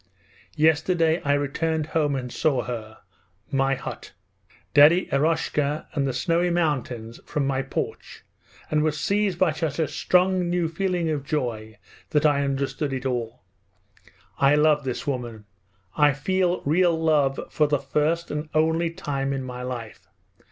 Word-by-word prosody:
Yesterday 160 +2 +2
I 145 - +1
returned 155 +2 -1
home 150 -2 0
and 125 -2 -4
saw 135 -6 +1
her, 110 -1 -6 0.5
my 135 0 +2
hut. - - -8 0.6
Daddy 155 +5 +6
Eroshka, 150 0 0
and 140 -2 0
the - - 0
snowy 170 +7 +1
mountains, 130 -9 -2
from 145 -2 -2
my 135 -1 0
porch, 135 - -5 0.5
and 155 0 +2
was 150 -1 0
seized 200 -1 0
by 180 -2 +3
such 155 -2 -3
a 160 -2 +1
strong, 180 +4 +2
new 175 -1 +1
feeling 175 0 -1
of 145 -3 -2
joy 115 -7 -3 0.3
that 150 0 +1
I 145 -1 +3
understood 140 +1 -2
it 130 0 -4
all. 120 -3 -3 1.0
I 140 +1 +5
love 150 -1 +3
this 130 -2 -3
woman; 120 -6 -4 0.5
I 150 -1 +4
feel 180 +5 0
real 165 +2 +3
love 150 -4 +2
for 150 - +2
the 145 0 +2
first 155 +4 -1
and 150 +1 -4
only 160 +2 +2
time 140 -4 -3
in 135 -1 -3
my 125 -1 -6
life. 120 -4 -7
150 Hz, 150 wpm, -24 LUFS, 135-165 Hz, 1.0 s, Daddy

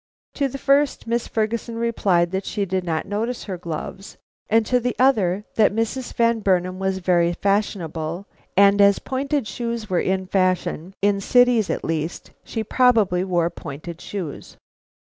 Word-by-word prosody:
To 280 - 0
the 275 - -6
first, 280 +1 +2
Miss 235 +1 -1
Ferguson 230 +1 -2
replied 195 -7 +1
that 190 +1 -2
she 205 - -1
did 185 0 -1
not 160 -2 -2
notice 225 +5 -3
her 195 - -5
gloves, 175 +4 -7 0.3
and 225 0 +3
to 250 +3 +2
the 245 +1 -2
other, 210 -8 +2
that 215 -2 +4
Mrs. 230 +3 -2
Van 230 -1 +2
Burnam 185 -2 0
was 190 0 -1
very 175 -2 +2
fashionable, 175 -3 -2 0.3
and 200 0 +6
as 200 -1 +6
pointed 275 -1 -2
shoes 230 0 -4
were 180 - +2
the 190 0 0
fashion, 185 -1 -1
in 200 -1 +2
cities 245 -1 +4
at - - -2
least, 160 +1 -3
she 225 - -4
probably 220 -6 +3
wore 175 -2 0
pointed 160 +3 -8
shoes. 180 -8 -7
200 Hz, 160 wpm, -22 LUFS, 180-230 Hz, 0.3 s, and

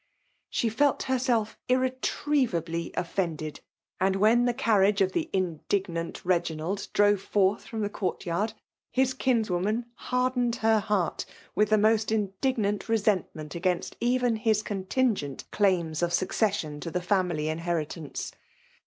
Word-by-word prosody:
She 235 - 0
fidt 280 +5 +2
hersrif 245 -4 0
irni> 255 0 +1
Iriemibly 170 - 0
offended; 165 -4 -2 0.4
and 190 +1 +2
when 220 +5 +4
the 245 - +2
carriBige 210 -5 +3
idt 190 -1 +3
the 330 -1 -2
indignant 175 -1 -2
Reginald 175 +1 -1
drove 205 -1 +3
forth 195 0 +1
from 220 -3 -2
k'ho' 200 -2 -2
eourt - - -13
yard, 200 +6 -1 0.4
his 260 +1 +1
kinswoman 220 -4 0
hardened 250 -1 0
het 220 -3 +2
heart 200 -5 0 0.3
with 210 0 +2
the 215 - +5
most 215 +1 +3
indignant 210 0 0
lesentmeit 200 -8 0
4lgaiddt 175 +3 -1
even 245 -1 +2
his 220 -1 +1
contingent 195 - -1
claims 175 -6 +1
of 175 - +2
suecei 185 +5 +1 0.3
mofi'to 165 - -5
the 180 - -1
family 180 -5 +1
inheritance. 160 -1 -3
205 Hz, 130 wpm, -27 LUFS, 175-230 Hz, 0.4 s, the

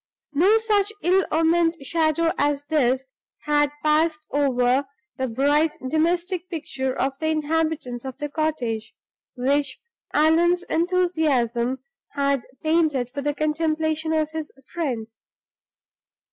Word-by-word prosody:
No 375 +9 +5
such 425 -2 +1
ill 370 +2 +4
omened 330 +1 +3
shadow 330 +2 +1
as 290 0 0
this 265 -4 +1 0.4
had 295 -1 +2
passed 310 0 +2
over 265 -1 +2 0.3
the 260 - -1
bright 290 +6 +2
domestic 345 +3 0
picture 270 -5 -3
of 270 +1 -1
the 315 - -1
inhabitants 310 -5 -1
of 265 -2 -7
the 295 - -3
cottage, 265 -8 -2 0.4
which 280 +3 +1 0.3
Allan's 340 +4 +3
enthusiasm 300 -9 0 0.3
had 280 -2 0 0.2
painted 310 -6 +1
for 280 +1 -4
the 290 +1 -1
contemplation 315 +1 0
of 310 -1 0
his 315 -1 -5 0.2
friend. 245 -10 -3
305 Hz, 115 wpm, -23 LUFS, 270-325 Hz, 0.4 s, No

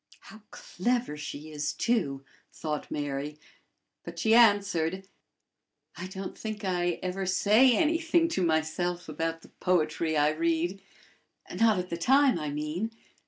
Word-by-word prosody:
"How 220 - -14
clever 240 -2 -2
she 150 +1 -7
is, 145 -1 -2
too!" 140 - -1 0.3
thought 150 -2 -4
Mary; 145 +1 -4 0.6
but - - -9
she 220 - +2
answered: 195 -5 +3 0.9
"I 185 - -6
don't 190 0 -7
think 215 -2 -6
I 175 -2 0
ever 185 +1 -3
say 220 +7 +4
anything 330 +1 +2
to 320 - -1
myself 170 +2 -1
about 165 +1 -3
the - - -16
poetry 160 -2 0
I 150 0 +4
read 165 +4 -1 0.7
not 225 -3 +3
at 180 0 -4
the 170 - -2
time, 265 +2 +4
I 150 -1 -3
mean. 150 +8 -3
180 Hz, 135 wpm, -28 LUFS, 155-215 Hz, 0.9 s, say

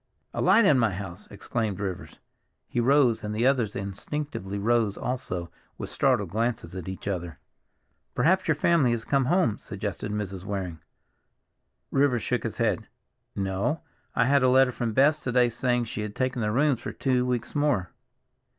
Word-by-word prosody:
"A - - -2
light 230 - +5
in 145 -7 +5
my 115 -2 +3
house!" 95 +1 -8
exclaimed 105 -1 -3
Rivers. 95 -3 -5 0.5
He - - -2
rose, 125 -2 +3
and 105 0 -3
the 115 +3 +1
others 125 -6 +2
instinctively 100 +1 -4
rose 110 -1 +1
also, 90 -9 -4 0.3
with - - -6
startled - - +1
glances 115 -1 -2
at 95 -2 -6
each 95 +1 -7
other. 85 -4 -3 0.8
"Perhaps 185 +3 +3
your 160 - +3
family 155 -3 +3
has 115 -1 -3
come 135 -2 +2
home," 130 - +2
suggested 100 +1 -5
Mrs. 100 -3 -4
Waring. 95 -5 -4 1.1
Rivers 135 -4 +2
shook 125 - 0
his 115 - -4
head. 110 -6 0 0.5
"No, 95 +10 -1 0.3
I 125 - +3
had 140 +1 +4
a 130 - +4
letter 130 0 +5
from 120 -2 -3
Bess 145 +5 +4
to 130 - -3
day 125 -1 +4
saying 120 +1 0
she 110 -1 -5
had 105 -1 -5
taken 130 -1 -1
the 105 - 0
rooms 135 +2 +2
for - - -5
two 130 -2 +1
weeks 125 -2 -2
more. 145 - +1
115 Hz, 170 wpm, -27 LUFS, 100-130 Hz, 1.1 s, light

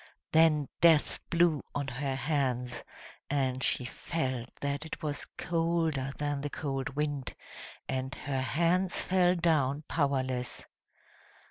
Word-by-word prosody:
Then 155 -3 +5
Death 165 -3 +5
blew 170 -3 +3
on 145 -1 -1
her 135 +2 -2
hands, 130 -3 -1 0.5
and 130 -2 0
she 125 - +2
felt 130 -3 -3
that 140 +1 -2
it 160 - -7
was 145 -2 -1
colder 165 -5 0
than 145 -1 -1
the 145 - -3
cold 135 -2 -3
wind, 145 -2 -2 0.5
and 130 +1 -2
her 135 -2 -2
hands 175 +6 +1
fell 180 -1 +3
down 150 -4 +2
powerless. 130 -5 0
145 Hz, 120 wpm, -31 LUFS, 130-160 Hz, 0.5 s, Then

